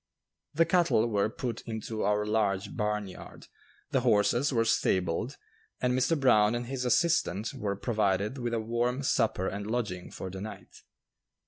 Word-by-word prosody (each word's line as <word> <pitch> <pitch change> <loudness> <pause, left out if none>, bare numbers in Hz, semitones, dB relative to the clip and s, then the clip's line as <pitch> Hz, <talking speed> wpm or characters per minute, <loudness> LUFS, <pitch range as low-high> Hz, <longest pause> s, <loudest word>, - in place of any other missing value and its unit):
The 165 +2 +4
cattle 170 - +3
were 105 -2 +1
put 115 0 -4
into 110 -1 -4
our 105 +1 +1
large 105 -3 0
barnyard, 105 -3 -4 0.5
the - - +3
horses 120 +7 +3
were 115 -3 +2
stabled, 95 +6 0 0.4
and 125 0 +1
Mr. 135 +5 +2
Brown 115 -4 +4
and 120 0 -3
his 130 0 -3
assistant 125 - +1
were 100 -1 -2
provided 105 +2 0
with 120 -1 -1
a - - 0
warm 120 +4 -1
supper 110 -7 +1
and 100 +1 -4
lodging 105 -7 -3
for 95 - -7
the 95 0 -7
night. 110 +1 -9
110 Hz, 150 wpm, -29 LUFS, 105-125 Hz, 0.5 s, The